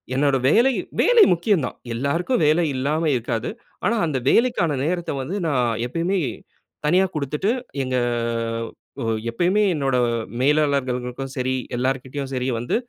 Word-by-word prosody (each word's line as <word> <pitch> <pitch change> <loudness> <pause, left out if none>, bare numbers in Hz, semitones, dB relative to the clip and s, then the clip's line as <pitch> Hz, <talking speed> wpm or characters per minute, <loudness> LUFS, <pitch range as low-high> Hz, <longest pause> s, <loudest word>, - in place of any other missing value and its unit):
என்னோட 140 0 +3
வேலை, 240 - +5 0.3
வேலை 475 -3 +6
முக்கியம் 170 - +1
தான். - - -6 0.2
எல்லாருக்கும் 165 - 0
வேலை 155 +3 +4
இல்லாம 150 +5 0
இருக்காது. 115 -1 -2 0.4
ஆனா, 230 +4 +2
அந்த 145 -4 -1
வேலைக்கான 230 - +3
நேரத்த 175 +1 -1
வந்து 180 +10 -3
நா 150 - 0 0.3
எப்பயுமே, 170 +8 -1 0.7
தனியா 180 +5 +4
குடுத்துட்டு 150 - -1 0.3
எங்க 130 0 -2 1.1
ஒ - - -2 0.2
எப்பயுமே 180 - +2
என்னோட 135 -3 0 0.5
மேலாளர்களுக்கும் 135 -3 0
சரி, 130 +1 0 0.2
எல்லார்கிட்டயும் 135 +2 -2
சரி 125 0 -1
வந்து 120 +2 -1
145 Hz, 125 wpm, -22 LUFS, 130-175 Hz, 1.1 s, வேலை